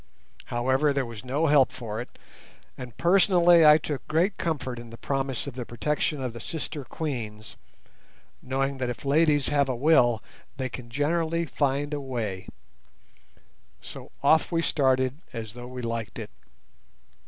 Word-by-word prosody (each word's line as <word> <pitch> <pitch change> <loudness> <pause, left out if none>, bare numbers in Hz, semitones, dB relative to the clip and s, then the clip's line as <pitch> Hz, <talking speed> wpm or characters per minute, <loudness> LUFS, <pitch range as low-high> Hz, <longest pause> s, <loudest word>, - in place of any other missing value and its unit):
However, 130 +5 +1
there 140 -2 0
was 115 -3 -9
no 140 +5 0
help 145 -4 +5
for 115 -3 -5
it, 125 - -11 0.6
and 125 -4 -9
personally 175 -2 +5
I 150 0 +8
took 150 -2 -5
great 170 +6 +1
comfort 130 -7 -3
in 120 -1 -10
the 115 - -10
promise 135 -2 -2
of 140 - -6
the 125 0 -5
protection 145 +4 -2
of 125 -3 -3
the 120 - -8
sister 150 +2 -5
Queens, 110 -7 -5 0.9
knowing 135 +1 -2
that 125 -1 -1
if 125 - -6
ladies 145 0 +3
have 140 -2 +2
a 130 - 0
will 120 -4 +3 0.3
they 130 -1 -2
can 120 -1 -9
generally 165 +5 0
find 145 0 -1
a 145 - -2
way; 110 -8 -4 1.3
so - - -10
off 160 +2 +4
we 165 -1 +1
started 130 0 +1
as 110 -3 -6
though 120 0 -9
we 125 0 -7
liked 115 -2 -4
it. - - -7
135 Hz, 155 wpm, -26 LUFS, 120-150 Hz, 1.3 s, I